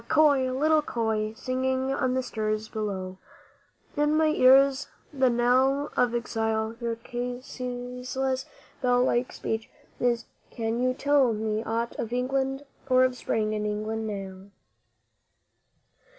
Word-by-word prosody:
köil, 275 Hz, -4 st, +4 dB
little 310 Hz, +1 st, +4 dB
köil, 220 Hz, -5 st, -1 dB
singing 260 Hz, +1 st, -1 dB
on 255 Hz, -2 st, 0 dB
the 260 Hz, -, 0 dB
siris 215 Hz, -2 st, -2 dB
bough, 190 Hz, -4 st, -4 dB, 0.8 s
In 295 Hz, +1 st, +2 dB
my 315 Hz, 0 st, +4 dB
ears 275 Hz, 0 st, +5 dB, 0.3 s
the 265 Hz, -2 st, +3 dB
knell 255 Hz, +4 st, +2 dB
of 240 Hz, -1 st, +2 dB
exile 225 Hz, -1 st, -1 dB
your 230 Hz, -1 st, -2 dB
ceaseless 250 Hz, +2 st, -4 dB, 0.3 s
bell 245 Hz, -1 st, +3 dB
like 245 Hz, 0 st, +1 dB
speech 220 Hz, 0 st, -4 dB, 0.3 s
is 240 Hz, -1 st, +1 dB, 0.2 s
Can 230 Hz, +1 st, -2 dB
you 255 Hz, 0 st, +1 dB
tell 280 Hz, -4 st, +3 dB
me 215 Hz, 0 st, -2 dB
aught 230 Hz, +1 st, -2 dB
of 230 Hz, -, -3 dB
England 270 Hz, +2 st, -1 dB, 0.2 s
or 255 Hz, 0 st, +5 dB
of 255 Hz, -1 st, +2 dB
Spring 215 Hz, -3 st, -1 dB
in 210 Hz, -1 st, -2 dB
England 215 Hz, +1 st, -3 dB
now? 195 Hz, -1 st, -7 dB
245 Hz, 125 wpm, -27 LUFS, 220-260 Hz, 0.8 s, ears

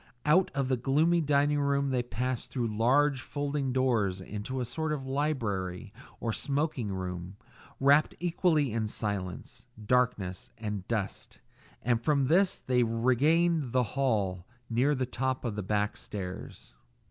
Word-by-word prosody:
Out 170 Hz, +5 st, +4 dB
of 135 Hz, -2 st, 0 dB
the 130 Hz, -1 st, +1 dB
gloomy 155 Hz, +7 st, +3 dB
dining 145 Hz, 0 st, +2 dB
room 140 Hz, -1 st, +1 dB
they 125 Hz, -1 st, +1 dB
passed 125 Hz, +1 st, -3 dB
through 115 Hz, -5 st, -2 dB
large 135 Hz, +4 st, +3 dB
folding 145 Hz, -2 st, -2 dB
doors 115 Hz, -8 st, +1 dB
into 105 Hz, +7 st, -5 dB
a 125 Hz, -, -1 dB
sort 160 Hz, +5 st, -3 dB
of 140 Hz, -3 st, -3 dB
library 115 Hz, -9 st, -2 dB, 0.3 s
or 115 Hz, -2 st, -2 dB
smoking 140 Hz, -4 st, -1 dB
room, 90 Hz, 0 st, -5 dB, 0.4 s
wrapt 140 Hz, +3 st, +4 dB
equally 165 Hz, -, +1 dB
in 110 Hz, -1 st, 0 dB
silence, 100 Hz, -4 st, -4 dB, 0.2 s
darkness, 105 Hz, -7 st, 0 dB
and 105 Hz, -4 st, -4 dB
dust; 105 Hz, -4 st, -3 dB, 0.5 s
and 120 Hz, 0 st, +1 dB
from 140 Hz, -1 st, +2 dB
this 180 Hz, +7 st, +3 dB
they 125 Hz, -1 st, +1 dB
regained 130 Hz, +6 st, +2 dB
the 130 Hz, -1 st, +4 dB
hall 100 Hz, -9 st, 0 dB, 0.2 s
near 130 Hz, +6 st, +3 dB
the 130 Hz, -1 st, 0 dB
top 130 Hz, +1 st, -2 dB
of 115 Hz, -, -1 dB
the 105 Hz, -, -2 dB
back 105 Hz, +2 st, 0 dB
stairs. 95 Hz, -3 st, -7 dB
125 Hz, 145 wpm, -29 LUFS, 105-145 Hz, 0.5 s, Out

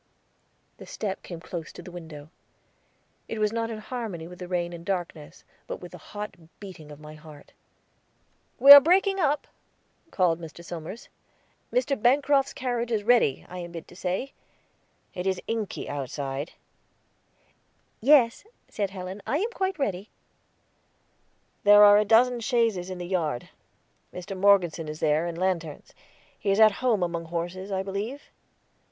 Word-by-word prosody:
The -, -, -12 dB
step 200 Hz, -2 st, -4 dB
came 170 Hz, -2 st, -8 dB
close 170 Hz, -1 st, -7 dB
to -, -, -11 dB
the 180 Hz, -, -10 dB
window; 160 Hz, -3 st, -10 dB, 1.0 s
it 225 Hz, -, -5 dB
was 215 Hz, 0 st, 0 dB
not 230 Hz, 0 st, -2 dB
in 225 Hz, -, -5 dB
harmony 215 Hz, -7 st, -6 dB
with 180 Hz, 0 st, -12 dB
the 180 Hz, -, -7 dB
rain 175 Hz, -1 st, -2 dB
and 170 Hz, -1 st, -9 dB
darkness, 170 Hz, -5 st, -5 dB, 0.2 s
but -, -, -5 dB
with 175 Hz, -, -11 dB
the 180 Hz, -, -11 dB
hot 210 Hz, +5 st, -7 dB, 0.3 s
beating 180 Hz, -7 st, -11 dB
of 145 Hz, -, -11 dB
my 150 Hz, 0 st, -11 dB
heart. 150 Hz, -1 st, -15 dB, 1.0 s
"We 275 Hz, +3 st, +8 dB
are 285 Hz, -, +15 dB
breaking 385 Hz, +5 st, +3 dB
up," 295 Hz, -3 st, +1 dB, 0.6 s
called 175 Hz, -, +1 dB
Mr. 165 Hz, +1 st, -10 dB
Somers. 170 Hz, +6 st, -8 dB, 0.6 s
"Mr. 285 Hz, -, 0 dB
Bancroft's 275 Hz, +2 st, +3 dB
carriage 245 Hz, -2 st, -3 dB
is 215 Hz, -2 st, 0 dB
ready, 230 Hz, -, +3 dB
I 180 Hz, -, -8 dB
am 175 Hz, -1 st, -8 dB
bid 165 Hz, -2 st, -8 dB
to -, -, -14 dB
say. 185 Hz, +9 st, -3 dB, 0.8 s
It 180 Hz, +1 st, -4 dB
is 190 Hz, -1 st, 0 dB
inky 225 Hz, -4 st, -4 dB
outside." 140 Hz, +2 st, -5 dB, 1.5 s
"Yes," 250 Hz, -2 st, +4 dB, 0.3 s
said 200 Hz, -2 st, -2 dB
Helen, 190 Hz, +1 st, -7 dB
"I 285 Hz, -, +1 dB
am 435 Hz, +8 st, -1 dB
quite 380 Hz, -3 st, -2 dB
ready." 205 Hz, -, -3 dB, 1.5 s
"There 205 Hz, 0 st, +8 dB
are 205 Hz, 0 st, +8 dB
a 210 Hz, -, +1 dB
dozen 240 Hz, +3 st, +4 dB
chaises 225 Hz, -7 st, 0 dB
in 185 Hz, -, -5 dB
the 175 Hz, -, -6 dB
yard; 160 Hz, -9 st, -2 dB, 0.6 s
Mr. 180 Hz, +2 st, -7 dB
Morgeson 185 Hz, -5 st, +3 dB
is 155 Hz, 0 st, -7 dB
there, 155 Hz, +3 st, +1 dB
and 170 Hz, -1 st, -5 dB
lanterns. 170 Hz, -5 st, -3 dB, 0.5 s
He 200 Hz, -, -2 dB
is 195 Hz, +2 st, +2 dB
at 215 Hz, -1 st, +8 dB
home 230 Hz, -7 st, +2 dB
among 170 Hz, -1 st, -3 dB
horses, 175 Hz, +4 st, -5 dB
I 190 Hz, 0 st, -1 dB
believe." 205 Hz, +8 st, -5 dB
190 Hz, 155 wpm, -26 LUFS, 170-230 Hz, 1.5 s, are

